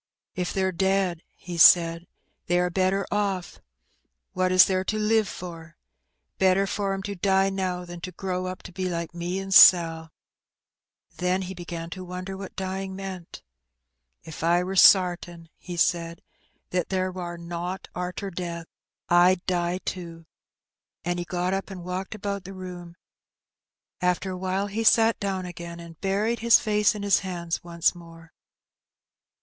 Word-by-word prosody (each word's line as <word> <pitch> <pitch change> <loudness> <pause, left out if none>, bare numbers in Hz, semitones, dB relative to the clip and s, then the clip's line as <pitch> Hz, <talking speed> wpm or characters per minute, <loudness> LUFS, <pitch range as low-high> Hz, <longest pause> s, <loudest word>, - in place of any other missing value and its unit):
"K 180 - -1
they're 190 +1 0
dead," 190 -2 0
he 175 -2 -7
said, 170 0 +6 0.4
"they 175 - +2
are 180 0 +1
better 190 +2 +1
oflF: 200 -3 -2 0.7
what 185 -1 +1
is 185 0 +8
there 185 -1 0
to 215 +3 -2
live 215 0 +2
for? 170 -2 -9 0.6
Better 190 +1 +4
for 195 0 -2
*em 195 - -6
to 200 - -4
die 195 +1 +2
now 185 -2 -2
thati 175 -1 -9
to 185 - -6
grow 185 0 -3
up 185 0 -7
to - - -10
be 185 +1 -4
Hke 170 -2 -3
me 175 +2 -3
and 195 0 -3
Sal.'' 165 -3 +7 1.1
Then 180 +1 0
he 185 +1 -6
began 170 -2 -7
to 185 +1 -6
wonder 180 +1 -6
what 195 0 -9
dying 190 0 -4
meant. 190 -3 -8 0.8
"If 160 -1 -9
I 175 +2 +3
wur 185 +1 -4
sartin," 175 -3 +4
he 175 -1 -8
said, 170 -1 0 0.2
" - - -43
that 180 -1 -1
there 185 -1 -1
wur 175 -2 -6
nowt 175 +2 -5
arter 180 +2 -4
death, 170 -2 -5 0.5
Fd 175 +1 +4
die 175 -1 0
too." 170 -2 -6 0.8
And 175 0 -1
he 175 - -3
got 180 +1 -2
up 195 +1 -3
and 185 -3 -8
walked 185 +3 -4
about 200 -2 -4
the 195 +1 -9
room; 180 -2 -9 1.1
after 180 +1 0
awhile 185 +2 -2
he 210 +3 -3
sat 225 0 +4
down 195 -2 -2
again, 170 -1 -8
and 170 -1 -12
buried 210 +4 0
his 235 0 +6
face 210 0 +2
in 205 - -5
his 200 -1 +4
hands 175 -3 -4
once 170 -1 +1
more. 165 -1 -14
185 Hz, 160 wpm, -25 LUFS, 175-195 Hz, 1.1 s, is